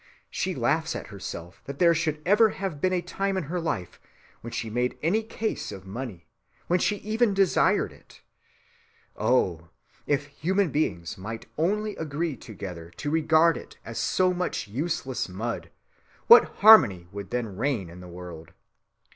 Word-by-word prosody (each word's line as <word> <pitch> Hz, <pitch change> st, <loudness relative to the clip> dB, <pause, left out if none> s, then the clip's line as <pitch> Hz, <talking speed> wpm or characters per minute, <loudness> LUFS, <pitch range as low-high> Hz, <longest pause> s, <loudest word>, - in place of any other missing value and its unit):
She -, -, -2 dB
laughs -, -, 0 dB
at -, -, -6 dB
herself 85 Hz, +2 st, -8 dB
that 140 Hz, 0 st, -7 dB
there 170 Hz, 0 st, +5 dB
should 155 Hz, -2 st, -1 dB
ever 210 Hz, +4 st, +5 dB
have 190 Hz, -8 st, -5 dB
been 185 Hz, -, +2 dB
a 180 Hz, -1 st, 0 dB
time 195 Hz, +2 st, -2 dB
in 185 Hz, -, -1 dB
her 170 Hz, +5 st, -3 dB
life 95 Hz, -, -3 dB, 0.4 s
when 120 Hz, -, -7 dB
she 115 Hz, -, -3 dB
made 125 Hz, +3 st, -1 dB
any 195 Hz, +8 st, +2 dB
case 220 Hz, 0 st, -4 dB
of 95 Hz, -1 st, -9 dB
money, 100 Hz, -4 st, -7 dB, 0.4 s
when 180 Hz, +1 st, +2 dB
she 210 Hz, +3 st, -1 dB
ever 235 Hz, +2 st, +4 dB
desired 195 Hz, -2 st, +2 dB
it.... -, -, -19 dB, 0.9 s
Oh! 85 Hz, -10 st, +1 dB, 0.4 s
if 145 Hz, -1 st, +1 dB
human 175 Hz, +5 st, 0 dB
beings 90 Hz, -, -2 dB
might 115 Hz, +4 st, -6 dB
only 210 Hz, +6 st, 0 dB
agree 160 Hz, 0 st, -2 dB
together 90 Hz, -8 st, -8 dB
to 145 Hz, -, -3 dB
regard 160 Hz, +1 st, +4 dB
it -, -, -11 dB
as 115 Hz, 0 st, -5 dB
so 185 Hz, -1 st, +2 dB
much 180 Hz, -10 st, -2 dB
useless 130 Hz, -, -2 dB
mud, 115 Hz, +6 st, -4 dB, 0.6 s
what 465 Hz, -, +9 dB, 0.2 s
harmony 120 Hz, -, +8 dB
would 100 Hz, -1 st, -7 dB
then 120 Hz, -5 st, -3 dB
reign 115 Hz, -4 st, -1 dB
in 85 Hz, +2 st, -11 dB
the 90 Hz, -, -10 dB
world! 85 Hz, -2 st, -10 dB
145 Hz, 160 wpm, -26 LUFS, -, 0.9 s, what